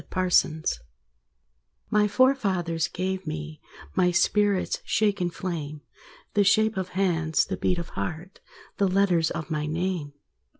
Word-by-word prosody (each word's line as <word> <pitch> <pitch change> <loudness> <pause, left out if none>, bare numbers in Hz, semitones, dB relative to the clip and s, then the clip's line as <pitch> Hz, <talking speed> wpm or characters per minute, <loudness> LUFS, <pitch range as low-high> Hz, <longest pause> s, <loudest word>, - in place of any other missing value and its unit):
Driftwood 180 -4 +2 1.3
My 210 0 +4
forefathers 195 - +1
gave 185 0 -3
me 75 0 -6 0.3
My 180 - +3
spirit's 200 +2 +1
shaken 200 -5 +1
flame, 155 -4 -5 0.5
The 205 - +4
shape 220 +2 +3
of 185 -1 -3
hands, 165 -5 +2
the 190 - -3
beat 180 -1 0
of 170 -1 -5
heart, 175 +3 -5 0.4
The 200 - +3
letters 185 -4 +2
of 165 -1 -5
my 150 -1 -1
name. 165 -2 -2
180 Hz, 125 wpm, -26 LUFS, 165-195 Hz, 1.3 s, My